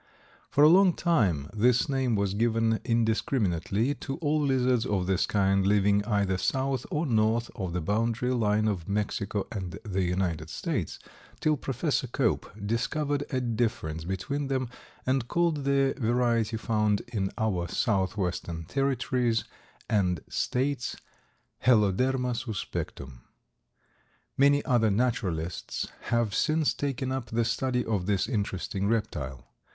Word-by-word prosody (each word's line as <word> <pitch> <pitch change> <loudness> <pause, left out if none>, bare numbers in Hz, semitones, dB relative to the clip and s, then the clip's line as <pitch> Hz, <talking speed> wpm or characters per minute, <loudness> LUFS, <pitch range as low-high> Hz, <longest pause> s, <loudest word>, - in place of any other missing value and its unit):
For 145 - +4
a - - +9
long 185 +2 +6
time 100 - +1
this 120 +3 +3
name 130 -4 +1
was 100 -1 0
given 115 +1 +1
indiscriminately 110 - +1
to 135 -1 -6
all 155 -1 +1
lizards 130 -4 +2
of 100 -6 0
this 95 0 +1
kind, 95 -1 +2
living 100 0 +3
either 100 -4 +1
south 135 +5 -1
or 150 +3 -1
north 115 -1 +1
of 95 -4 -4
the 90 - -1
boundary 115 +6 0
line 110 -2 +2
of 95 -5 -2
Mexico 100 0 -1
and 95 -5 -5
the 95 -2 -1
United 90 -3 -1
States, - - -3 0.4
till 155 0 +2
Professor 135 -1 -1
Cope 125 -1 0 0.2
discovered 140 +6 -1
a 130 - 0
difference 110 -10 -1
between 95 - -3
them 130 -2 -1 0.4
and 130 -2 +1
called 165 -3 0
the 135 -1 +3
variety 115 -2 +1
found 105 -2 +1
in 100 -5 -1
our 100 -7 0
southwestern 95 -6 -1
territories 125 - 0 0.4
and 90 -6 +1
states 130 0 -1 0.7
Heloderma 125 +3 +3
suspectum. 85 - -5 1.2
Many 140 +1 +4
other 120 -4 +3
naturalists 100 -7 -1 0.2
have 120 -3 +1
since 155 -1 +2
taken 135 -2 -2
up 130 -3 -3
the 115 +1 +1
study 125 0 0
of 100 -5 -1
this 100 -2 +1
interesting 100 -3 -2
reptile. 75 - -2
115 Hz, 130 wpm, -28 LUFS, 100-130 Hz, 1.2 s, a